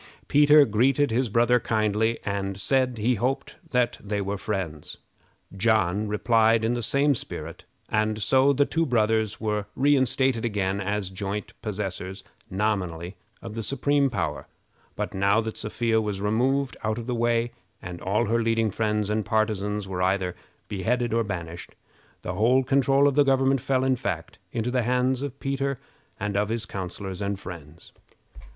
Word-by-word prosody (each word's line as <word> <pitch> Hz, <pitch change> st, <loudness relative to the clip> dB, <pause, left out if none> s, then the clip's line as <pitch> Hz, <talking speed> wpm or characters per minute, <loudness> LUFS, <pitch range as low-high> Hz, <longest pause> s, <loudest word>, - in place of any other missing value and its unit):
Peter 150 Hz, 0 st, +6 dB
greeted 130 Hz, +5 st, +2 dB
his 120 Hz, +1 st, +1 dB
brother 120 Hz, +3 st, +3 dB
kindly, 110 Hz, 0 st, +1 dB
and 100 Hz, -1 st, -2 dB
said 130 Hz, +2 st, +1 dB
he 115 Hz, +4 st, +2 dB
hoped 125 Hz, +4 st, -2 dB
that 125 Hz, -1 st, +1 dB
they 105 Hz, 0 st, -2 dB
were 100 Hz, +1 st, -2 dB
friends. 95 Hz, -7 st, -4 dB, 0.6 s
John 105 Hz, -1 st, +2 dB
replied 115 Hz, +1 st, +3 dB
in 115 Hz, +2 st, +1 dB
the 120 Hz, -, -2 dB
same 140 Hz, +5 st, +2 dB
spirit, 125 Hz, -, -6 dB, 0.2 s
and 110 Hz, 0 st, 0 dB
so 130 Hz, +6 st, +4 dB
the 140 Hz, +1 st, +3 dB
two 165 Hz, +2 st, 0 dB
brothers 110 Hz, -3 st, +1 dB
were 105 Hz, -2 st, -2 dB
reinstated 130 Hz, -3 st, +2 dB
again 100 Hz, -4 st, -1 dB
as 100 Hz, -1 st, -2 dB
joint 100 Hz, +2 st, -4 dB
possessors, 95 Hz, -2 st, -4 dB, 0.3 s
nominally, 95 Hz, -3 st, -2 dB, 0.3 s
of 115 Hz, -2 st, -7 dB
the 115 Hz, -, -4 dB
supreme 140 Hz, +3 st, +1 dB
power, 120 Hz, -, -3 dB, 0.5 s
but, 105 Hz, 0 st, -3 dB
now 100 Hz, +2 st, +3 dB
that 110 Hz, -1 st, -3 dB
Sophia 110 Hz, +1 st, 0 dB
was 105 Hz, -2 st, -3 dB
removed 125 Hz, +7 st, +1 dB
out 110 Hz, 0 st, -1 dB
of 120 Hz, -, -5 dB
the 125 Hz, -, -2 dB
way, 120 Hz, 0 st, +1 dB, 0.3 s
and 90 Hz, -1 st, -8 dB
all 105 Hz, +5 st, +1 dB
her 115 Hz, +2 st, +1 dB
leading 115 Hz, -1 st, +1 dB
friends 105 Hz, 0 st, 0 dB
and 105 Hz, +1 st, 0 dB
partisans 105 Hz, -2 st, -1 dB
were 90 Hz, -1 st, -3 dB
either 95 Hz, -1 st, 0 dB, 0.3 s
beheaded 120 Hz, +4 st, -1 dB
or 115 Hz, 0 st, +2 dB
banished, 85 Hz, -5 st, -6 dB, 0.5 s
the -, -, -3 dB
whole 125 Hz, +5 st, +3 dB
control 135 Hz, +1 st, +3 dB
of 140 Hz, -, +2 dB
the 145 Hz, -, +4 dB
government 135 Hz, -1 st, +2 dB
fell, 130 Hz, 0 st, +1 dB
in 130 Hz, 0 st, +2 dB
fact, 100 Hz, -10 st, -4 dB
into 115 Hz, +2 st, -2 dB
the 125 Hz, 0 st, +1 dB
hands 125 Hz, +2 st, +1 dB
of 140 Hz, -1 st, -5 dB
Peter 140 Hz, -1 st, -2 dB, 0.4 s
and 105 Hz, 0 st, -2 dB
of 105 Hz, +1 st, +1 dB
his 115 Hz, 0 st, -1 dB
counselors 95 Hz, 0 st, -6 dB
and 100 Hz, -1 st, -2 dB
friends. 85 Hz, -4 st, -10 dB
110 Hz, 160 wpm, -25 LUFS, 100-125 Hz, 0.6 s, Peter